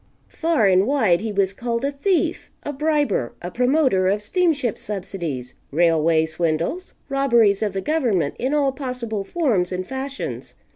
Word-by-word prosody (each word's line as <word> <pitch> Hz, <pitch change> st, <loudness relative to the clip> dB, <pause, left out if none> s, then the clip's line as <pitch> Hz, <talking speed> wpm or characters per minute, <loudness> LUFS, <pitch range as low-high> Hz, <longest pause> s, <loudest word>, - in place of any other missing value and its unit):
Far 325 Hz, -9 st, +1 dB
and 190 Hz, +1 st, +4 dB
wide 220 Hz, -11 st, +3 dB
he 220 Hz, 0 st, -3 dB
was 195 Hz, -1 st, +1 dB
called 235 Hz, +4 st, -2 dB
a 280 Hz, -, 0 dB
thief, 345 Hz, +6 st, 0 dB
a 290 Hz, -, -4 dB
briber, 290 Hz, -, 0 dB
a 175 Hz, -, -6 dB
promoter 250 Hz, -, +2 dB
of 205 Hz, +2 st, 0 dB
steamship 285 Hz, -, 0 dB
subsidies, 175 Hz, -11 st, -5 dB, 0.2 s
railway 160 Hz, 0 st, +3 dB
swindles, 165 Hz, -, -2 dB
robberies 235 Hz, -8 st, +3 dB
of 210 Hz, -3 st, -1 dB
the 195 Hz, -, -2 dB
government 235 Hz, -, 0 dB
in 260 Hz, +2 st, -1 dB
all 290 Hz, -2 st, +2 dB
possible 250 Hz, -6 st, -4 dB
forms 210 Hz, -, 0 dB
and 185 Hz, 0 st, -3 dB
fashions. 265 Hz, +4 st, -5 dB
220 Hz, 150 wpm, -22 LUFS, 185-275 Hz, 0.2 s, and